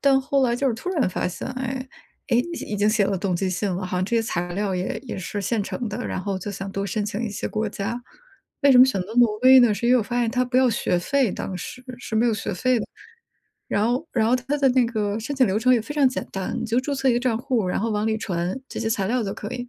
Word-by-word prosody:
但 270 -1 +4
后 275 +1 +1
来 240 -2 +2
就 275 - 0
是 230 - 0
突 360 - -6
然 295 - +1
发 180 - -2
现， 180 - -6
哎， 260 0 -4 0.4
诶， 235 - +3
已 330 -5 -3
已 - - 0
经 205 +1 +2
写 215 -2 +3
了 195 - 0
动 185 -1 -1
机 190 +1 -1
信 185 +2 -1
了， 185 +1 -3
好 180 - -3
像 185 - +1
这 235 +3 0
些 225 - +2
材 175 -4 -3
料 195 0 -1
也 180 +1 -2
也 235 - -5
是 195 +2 -4
现 210 +2 0
成 230 +3 -4
的， 215 +4 -4
然 - - -3
后 195 -1 -2
就 205 - -5
想 195 0 -6
多 195 0 -2
申 205 +2 -2
请 210 +2 -3
一 225 - -2
些 205 - -4
国 215 0 -2
家。 225 +5 -4 0.6
为 280 -1 +6
什 250 - +7
么 255 - +10
选 260 -8 0
择 190 +5 -6
挪 235 -3 +4
威 260 0 +9
呢？ 235 -3 +5
是 215 +4 -2
因 245 - +5
为 255 - +6
我 - - +1
发 245 +3 -2
现 235 - +1
它 250 +1 +1
不 250 0 -2
要 260 -1 +5
学 180 -5 0
费 265 +4 +1
当 185 - -5
时， 255 +7 -8
是 220 -2 -4
没 235 +2 +3
有 225 - +2
学 210 - -3
费 255 +6 +1
的。 - - -4 0.8
然 205 +2 +1
后 255 +7 0
然 225 -3 +2
后 250 - +4
它 270 +4 -2
的 275 -1 +4
那 250 -1 +4
个 210 -2 -1
申 285 +6 -4
请 260 -3 +4
流 195 +3 +1
程 255 +2 +3
也 235 - +2
非 260 +7 -7
常 285 -3 +4
简 255 - -4
单， 190 -1 -3
你 - - -2
就 235 +3 +1
注 280 +2 -3
册 270 0 +1
一 245 - +4
个 240 - +1
账 245 -3 +1
户， 245 -6 0
然 180 - -1
后 225 +1 -1
往 210 +1 0
里 220 0 0
传 180 +2 -2
这 - - -6
些 225 - -1
材 195 -3 0
料 245 +2 0
就 195 - -3
可 210 - -6
以。 245 0 -5
225 Hz, 325 characters per minute, -23 LUFS, 200-255 Hz, 0.8 s, 么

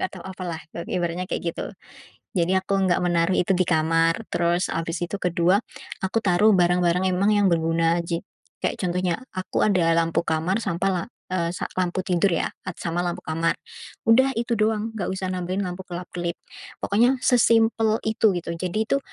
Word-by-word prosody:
nggak 185 - -1
tau - - -12
apa, 190 0 -8
lah, 165 -1 -4
ba 170 - -6
ibaratnya 175 +1 -2
kayak - - -3
gitu. - - -4 0.7
Jadi 175 +1 +2
aku 190 +1 -2
nggak 175 - +2
menaruh 175 +1 +2
itu 185 +2 +2
di 185 - +2
kamar. 165 +5 +2
Terus, 175 +1 +1
habis 165 0 -2
itu 205 - -5
ke-2 180 +2 +3 0.5
aku 190 +4 0
taruh 195 +3 +4
barang-barang 180 +1 +3
emang 200 +4 +2
yang 205 -1 +4
berguna 165 0 +2
aja. 170 0 -3 0.4
Kayak - - -1
contohnya, 180 -1 0 0.2
aku 185 0 -1
ada 180 -5 +3
lampu 165 0 +2
kamar, 165 +7 0
sampai, 170 +1 -1
la 175 - -1 0.3
eee, 170 -2 0
sa - - -3
lampu 185 0 -1
tidur, 180 +2 +2
ya, - - 0 0.2
at 185 - -5
sama 170 +1 -1
lampu 175 - -3
kamar. 165 +1 0 0.5
Udah, 260 +4 +5
itu 235 +1 0
doang, 215 +1 +1
nggak 200 -5 -2
usah 190 -1 -3
nampilin 185 +2 -2
lampu 180 +1 -5
kelap-kelip. 175 -1 -5 0.5
Pokoknya 240 +6 +3
sesimpel 225 -2 +4
itu, 220 -1 +3
gitu. 170 - -4
Jadi, 180 +5 -1
tuh, 275 - +3
180 Hz, 180 wpm, -24 LUFS, 170-200 Hz, 0.7 s, Udah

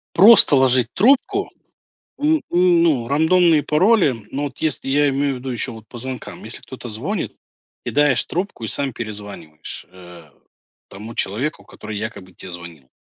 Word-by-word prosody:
просто 200 -4 +8
ложить 130 -2 +3
трубку, 280 - +2 0.7
н 305 +1 +2
ну 170 -8 +3
рандомные 160 +2 +3
пароли, 165 - +3 0.2
ну 140 +2 -3
вот, 145 - -6
если 155 -4 -2
я 145 +2 +3
имею 140 0 0
в - - -6
виду 130 +1 -7
еще 120 -2 -3
вот 110 -1 -12
по 120 - -11
звонкам, 130 0 -7
если 110 - -8
кто-то 125 -2 -9
звонит, 155 - -4 0.5
кидаешь 145 -3 +2
трубку 180 - -4
и - - -3
сам 135 +3 -2
перезваниваешь, 100 -9 -8
а, 90 -4 -15 0.6
тому 105 +4 -10
человеку, 125 +11 -2
который 105 -1 -9
якобы 105 -3 -7
те 95 - -11
звонил. 85 -6 -11
130 Hz, 150 wpm, -20 LUFS, 110-165 Hz, 0.7 s, просто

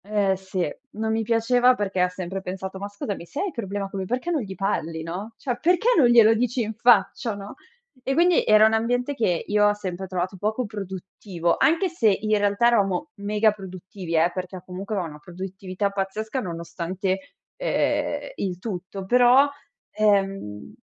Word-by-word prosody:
Eh, 200 -2 +1
sì. 190 -2 -3 0.3
Non 220 +1 -2
mi 225 0 +1
piaceva, 240 +3 +3
perché 195 -4 -2
ha 180 0 +3
sempre 185 +1 -5
pensato: 190 +1 -6
"Ma 200 - -4
scusami, 205 -3 -5
se 280 - -7
hai 395 -1 -1
problema 200 - -4
co' 195 - -7
lui, 190 - -2
perché 250 - -2
non 315 -5 +1
gli 195 -4 -6
parli, 165 -5 -2
no, 195 +7 -6
cioè 245 -3 -3
perché 355 +7 +3
non 280 -8 +6
glielo 230 -2 +7
dici 245 +2 0
in 220 +1 -4
faccia, 225 0 +3
no?" 200 0 -8 0.5
E 265 +2 -1
quindi 350 +1 +4
era 215 0 +6
un 220 - +3
ambiente, 245 +4 0
che 190 -10 0
io 210 0 +3
ho 205 - +3
sempre 190 -2 -5
trovato 185 +1 -3
poco 215 +6 -1
produttivo, 190 -3 -3
anche 330 +8 +3
se 320 -11 +2
in 215 +2 +1
realtà 205 +3 +3
eravamo 225 +4 +1
mega 210 +1 +2
produttivi, 185 -3 -7
eh, 165 +2 +3
perché 185 0 -5
a 180 - -9
comunque, 190 +3 -5
ono 185 -3 -1
una 150 0 -11
produttività 185 +3 -4
pazzesca, 205 +5 -3
nonostante, 185 +1 -4 0.2
ehm, - - -1
il 185 -3 -2
tutto, 190 -1 -6
però 250 +5 +6 0.4
ehm 195 - 0
200 Hz, 180 wpm, -24 LUFS, 185-230 Hz, 0.5 s, glielo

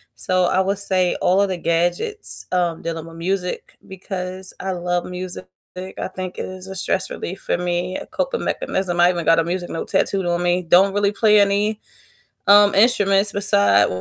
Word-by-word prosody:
so 185 -1 0
I 185 - +1
would 195 +1 0
say 185 -3 +1
all 185 +3 +3
of 200 - +1
the 185 - -2
gadgets, 175 - -1
um, 175 -2 0
dealing 165 -1 -5
with 165 0 -12
music 180 +1 -3
because 185 -1 -5
I 190 - -3
love 175 0 -2
music. 180 - -7 0.3
I 185 +1 -6
think 185 -1 -6
it - - -4
is 185 0 -9
a 190 - -7
stress 190 +1 -1
relief 190 +3 -6
for - - -1
me, 180 +1 -2
a - - -8
coping - - -3
mechanism, 190 - -2
I 175 +1 +6
even 170 -3 -2
got 165 0 +4
a - - +2
music 175 +1 -3
note 165 - -5
tattooed 195 -2 0
on 175 0 0
me, 175 +1 +1
don't 190 +4 +4
really 205 0 +1
play 210 -1 +4
any, 205 +2 +1 0.7
um, 205 0 +7
instruments 200 -3 +3
beside 100 - +3
185 Hz, 190 wpm, -20 LUFS, 175-195 Hz, 0.7 s, um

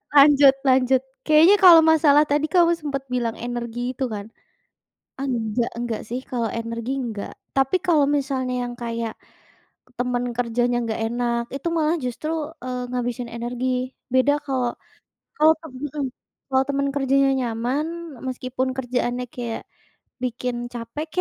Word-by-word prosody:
Lanjut 280 -1 +8
lanjut, 260 0 +4 0.2
kayaknya 320 +6 +7
kalau 345 -4 +9
masalah 305 -2 +5
tadi 295 +1 +2
kamu 340 -1 +4
sempat 280 -3 -3
bilang 235 -2 -1
energi 240 +1 -4
itu 260 +1 -2
kan? 205 -1 -5 0.9
Enggak 235 -3 -1
enggak 235 -2 -3
sih 245 +2 -2
kalau 235 -3 -2
energi 230 +2 -4
nggak. 220 -5 -5 0.2
Tapi 270 +7 +3
kalau 310 -5 +4
misalnya 270 -3 -1
yang 240 - -6
kayak 230 -1 -3 0.9
teman 245 0 0
kerjanya 240 0 +1
nggak 225 0 -3
enak 235 -1 -1
itu 280 +5 -3
malah 315 +2 +2
justru, 250 +5 -4 0.3
eee, 250 -1 -4
ngabisin 245 -1 -3
energi. 240 +2 -3 0.5
Beda 260 +3 +4
kalau 255 -3 0 0.7
kalau 310 +1 +6
tem 320 -5 -10
mmm, 290 +1 -4 0.4
kalau 265 0 +3
temen 280 0 0
kerjanya 275 0 +3
nyaman, 245 +5 -1 0.4
meskipun 255 0 -2
kerjaannya 245 -1 -1
kayak 235 -2 -4 0.6
bikin 250 0 -2 0.2
capek 240 +7 -5
255 Hz, 135 wpm, -23 LUFS, 240-280 Hz, 0.9 s, kalau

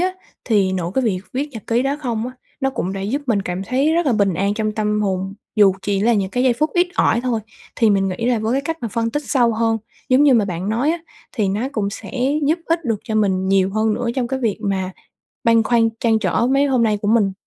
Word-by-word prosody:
á, 370 +1 +1 0.3
thì 200 -5 +2
nội 175 -2 -2
cái 265 - +1
việc 190 -5 0
viết 275 +4 -1
nhật 225 -6 -8
ký 235 +2 +1
đó 275 +2 0
không 235 -4 -2
á, 255 - -6 0.3
nó 270 0 +1
cũng 190 -7 -3
đã 195 - -4
giúp 245 +9 -2
mình 215 -5 +1
cảm 180 0 -3
thấy 265 +7 +1
rất 340 -1 +1
là 260 - +3
bình 200 -4 +2
an 200 +4 0
trong 215 0 -1
tâm 210 0 0
hồn, 195 -1 -2 0.2
dù 200 -3 +6
chỉ 200 -1 0
là 235 +3 +3
những 195 -3 0
cái 250 - 0
giây 255 - +4
phút 300 +7 0
ít 355 +1 +4
ỏi 235 - +2
thôi. 240 -3 0 0.4
Thì 225 -3 +4
mình 195 -1 +2
nghĩ 190 +6 -3
là 245 -2 +2
với 220 +2 -1
cái 275 - +1
cách 325 +2 -3
mà 230 - -2
phân 230 +1 -1
tích 295 +4 -2
sâu 245 -4 +3
hơn, 225 0 +1 0.3
giống 260 +3 +5
như 280 -3 +6
mà 220 - +3
bạn 185 0 -4
nói 240 +8 +1
á, 340 - -1 0.3
thì 210 -7 0
nó 215 +7 -1
cũng 200 -4 -1
sẽ - - -8 0.4
giúp 320 +3 +2
ích 330 -1 0
được 225 -4 -1
cho 220 - -4
mình 190 -3 +1
nhiều 195 0 +3
hơn 215 +1 +1
nữa 240 0 -2
trong 250 -3 -1
cái 265 +1 -2
việc 225 -5 0
mà 190 -3 -1 0.5
băn 230 -1 +5
khoăn, 230 0 +3
trăn 225 -2 +3
trở 230 +2 +1
mấy 275 +2 +3
hôm 255 -4 +2
nay 215 -2 +2
của 205 - 0
mình. 210 -4 +3
225 Hz, 270 wpm, -20 LUFS, 200-255 Hz, 0.5 s, dù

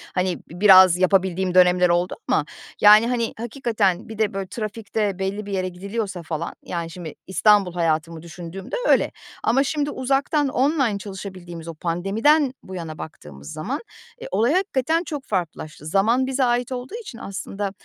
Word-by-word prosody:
hani, 180 -1 0
bi 175 +2 -13
biraz 185 -3 +8
yapabildiğim 185 0 +2
dönemler 180 -1 +5
oldu 175 +1 +1
ama, - - +2 0.4
yani, 215 +2 +8
hani, 235 -2 -1
hakikaten 225 -6 -1
bir 220 - -8
de, 215 -2 +1
böyle, 195 -1 -4
trafikte 215 -2 -3
belli 200 +2 -3
bir 205 - -7
yere 185 -1 -1
gidiliyorsa 195 0 -5
falan, 160 +1 -4
yani, 170 -2 -4
şimdi 165 -2 -8
İstanbul 195 -2 +3
hayatımı 165 -1 -1
düşündüğümde 175 - -7
öyle. - - +4 0.3
Ama 265 +5 +3
şimdi 290 +1 -1
uzaktan, 275 +3 +1
online 265 -4 +1
çalışabildiğimiz, 185 -4 -8
o 165 - -5
pandemiden 210 - +1
bu 190 - -9
yana 165 -3 -6
baktığımız 75 - -10
zaman, 245 - -4 0.4
eee, - - -6
olay 235 +6 +2
hakikaten 330 -3 +1
çok 290 -4 -5
farklılaştı. 160 -5 -4
Zaman 220 +9 +2
bize 265 0 0
ait 245 +1 +1
olduğu 255 - -5
için 260 - -10
aslında 200 -1 -5
195 Hz, 160 wpm, -23 LUFS, 175-240 Hz, 0.4 s, biraz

